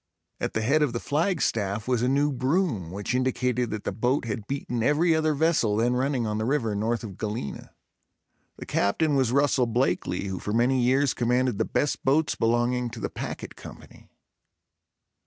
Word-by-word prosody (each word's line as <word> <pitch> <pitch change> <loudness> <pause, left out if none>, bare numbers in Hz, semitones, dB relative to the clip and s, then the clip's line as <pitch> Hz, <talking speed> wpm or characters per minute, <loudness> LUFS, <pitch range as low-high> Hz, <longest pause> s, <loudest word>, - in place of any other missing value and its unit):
At - - -2
the 110 - -1
head 145 +7 +3
of 145 -5 +1
the 120 - -2
flagstaff 115 - -1
was 125 -2 +1
a 125 - +2
new 145 +2 +2
broom 130 - 0
which 100 +6 -4
indicated 125 -1 0
that 105 -1 -4
the - - -2
boat 125 +4 0
had 105 -2 -4
beaten 130 -4 -3
every 155 +7 +3
other 155 -1 +1
vessel 145 -9 +2
then 120 +2 +2
running 130 -1 0
on 105 0 -2
the 110 - -1
river 120 -5 0
north 110 +3 -1
of 100 -5 -8
Galena. 105 -9 -4 0.9
The - - -8
Captain 150 +10 +1
was 130 -4 +2
Russell 135 -2 +2
Blakeley 95 -6 0
who 95 -2 -4
for 105 - -4
many 125 +3 +2
years 130 +2 +3
commanded 125 -2 +1
the 110 - +2
best 145 - -1
boats 145 +2 +2
belonging 120 +2 +1
to 115 0 -9
the - - -3
Packet - - -6
Company. - - -13
125 Hz, 180 wpm, -26 LUFS, 110-140 Hz, 0.9 s, head